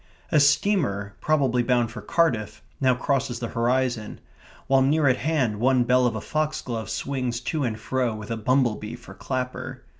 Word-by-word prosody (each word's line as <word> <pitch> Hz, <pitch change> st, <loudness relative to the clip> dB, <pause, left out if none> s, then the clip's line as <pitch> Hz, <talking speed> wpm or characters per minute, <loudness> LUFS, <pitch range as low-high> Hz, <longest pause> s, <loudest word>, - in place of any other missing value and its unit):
A 155 Hz, -, +5 dB
steamer, 140 Hz, -, +2 dB
probably 135 Hz, -5 st, +2 dB
bound 120 Hz, -2 st, +1 dB
for 115 Hz, -, -8 dB
Cardiff, 125 Hz, -12 st, 0 dB, 0.2 s
now 130 Hz, -2 st, +3 dB
crosses 125 Hz, -1 st, -1 dB
the 120 Hz, -1 st, -4 dB
horizon, 120 Hz, -2 st, -1 dB, 0.5 s
while 135 Hz, 0 st, +3 dB
near 145 Hz, +2 st, +3 dB
at 130 Hz, -, +3 dB
hand 130 Hz, -10 st, 0 dB
one 130 Hz, +1 st, +3 dB
bell 125 Hz, +1 st, +3 dB
of 115 Hz, -, -2 dB
a 110 Hz, -, -4 dB
foxglove 135 Hz, -7 st, -3 dB
swings 125 Hz, -4 st, -2 dB
to 155 Hz, -3 st, -2 dB
and 110 Hz, -3 st, -2 dB
fro 125 Hz, 0 st, -1 dB
with 105 Hz, +1 st, -8 dB
a -, -, 0 dB
bumble 120 Hz, 0 st, +2 dB
bee 105 Hz, +3 st, -7 dB
for 115 Hz, -5 st, -12 dB
clapper. 130 Hz, +2 st, -5 dB
125 Hz, 175 wpm, -25 LUFS, 115-135 Hz, 0.5 s, A